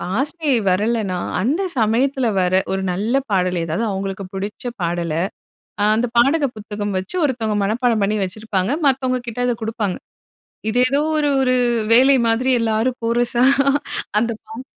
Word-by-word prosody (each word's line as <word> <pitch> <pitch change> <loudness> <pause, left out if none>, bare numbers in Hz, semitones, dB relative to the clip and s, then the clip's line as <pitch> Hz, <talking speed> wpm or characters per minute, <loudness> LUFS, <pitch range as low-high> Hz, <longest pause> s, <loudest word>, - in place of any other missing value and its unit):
ஆசிரியை 290 0 0
வரலைனா 205 -1 0 0.2
அந்த 285 - 0 0.2
சமயத்தில 245 +3 +1
வர, 180 0 +1 0.2
ஒரு 190 0 -1
நல்ல 210 +7 -2 0.2
பாடல் 180 -2 +1
ஏதாவது 165 +8 -2
அவங்களுக்கு 195 +1 -4
புடிச்ச 200 +4 -5 0.2
பாடல 170 -1 -1 0.7
அ - - +4
அந்த 240 +2 +1
பாடல் 280 +5 +4
புத்தகம் 205 -1 -5
வச்சு 185 - -5
ஒருத்தவங்க 225 -6 -1
மனப்பாடம் 225 +1 +1
பண்ணி 210 +2 +1
வச்சிருப்பாங்க. 195 +2 -2
மத்தவங்க 255 -2 +1
கிட்ட 235 +1 -5
அதை 245 - +1
குடுப்பாங்க. 220 -4 -2 0.7
இது 245 +3 +1
ஏதோ 280 +2 +1 0.2
ஒரு 295 -1 +1
ஒரு 255 -1 +2 0.4
வேலை 265 +3 +6
மாதிரி 240 +3 +1
எல்லாரும் 230 +3 0
கோரசா 240 +1 +1 0.8
அந்தப் 230 -1 -2
பாட் 230 +4 -8
225 Hz, 140 wpm, -20 LUFS, 195-255 Hz, 0.8 s, வேலை